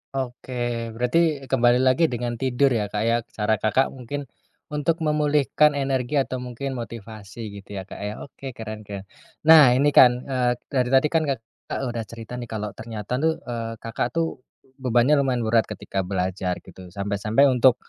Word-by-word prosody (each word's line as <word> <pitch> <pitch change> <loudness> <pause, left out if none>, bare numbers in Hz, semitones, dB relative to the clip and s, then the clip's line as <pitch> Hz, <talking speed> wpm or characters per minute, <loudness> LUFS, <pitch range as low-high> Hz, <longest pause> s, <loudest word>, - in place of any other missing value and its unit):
Oke, 120 -2 -3
berarti 140 +5 +1
kembali 125 -1 +4
lagi 130 +6 +4
dengan 120 -3 -3
tidur 130 +2 +2
ya, 110 -4 0
Kak, 105 +1 -2
ya 115 +1 +3
cara, 105 -1 -1
Kakak, 110 +6 +2
mungkin 135 +3 -6 0.5
untuk 160 +3 0
memulihkan 150 -1 +3
energi 135 -1 -1
atau 130 -2 0
mungkin 125 +2 -5
motivasi 110 -2 -8
gitu 100 +1 -11
ya, 95 - -4
Kak, 100 - -10
ya. 105 +1 -4
Oke, 135 -2 -9
keren 110 -2 -7
keren. 100 -2 -6 0.4
Nah 155 -6 +8
ini 145 +3 +3
kan, 125 -2 +6
eee, 125 -2 0 0.2
dari 125 -3 +1
tadi 135 +3 +5
kan, 165 -1 +2
Kakak, 115 -5 -5
udah 115 -1 -3
cerita 115 +2 -8
nih 120 - -6
kalau 105 -2 -4
ternyata 110 +2 -5
tuh, 160 +2 +2
eee, 115 -2 -4
Kakak, 115 +1 -1
tuh 165 -4 -1 0.4
bebannya 125 +3 +3
lumayan 130 -3 +1
berat 110 0 +2
ketika 100 -2 -5
belajar 90 -1 -1
gitu. 95 -1 -12
Sampai-sampai 100 +6 0
untuk 125 0 +5
120 Hz, 170 wpm, -24 LUFS, 110-135 Hz, 0.5 s, Nah